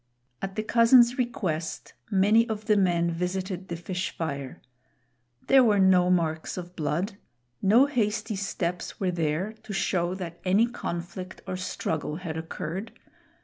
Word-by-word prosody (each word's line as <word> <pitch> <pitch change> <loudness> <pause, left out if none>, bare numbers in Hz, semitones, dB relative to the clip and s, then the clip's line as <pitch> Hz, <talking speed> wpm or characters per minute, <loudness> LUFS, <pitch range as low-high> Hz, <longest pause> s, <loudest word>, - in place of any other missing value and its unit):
At 195 0 -4
the 215 - -1
cousin's 235 +2 +5
request, 180 -10 -2 0.2
many 215 +4 +4
of 215 -1 -4
the 210 - +4
men 175 -3 +2
visited 185 +2 -3
the 170 - -4
fish 180 +2 -3
fire. 140 -5 -4 0.9
There 270 -1 +6
were 215 -4 +4
no 185 -2 +5
marks 165 -2 0
of 180 0 -7
blood. 175 +6 -2 0.4
No 225 +7 +6
hasty 225 -5 -1
steps 180 -2 -3
were 185 -2 +1
there 170 +4 -1
to 210 - -7
show 180 -2 0
that 175 -3 -7
any 195 +5 +4
conflict 185 -5 -6
or 185 - -3
struggle 160 -4 -3
had 165 -2 -5
occurred. 165 +5 -5
185 Hz, 145 wpm, -27 LUFS, 170-210 Hz, 0.9 s, There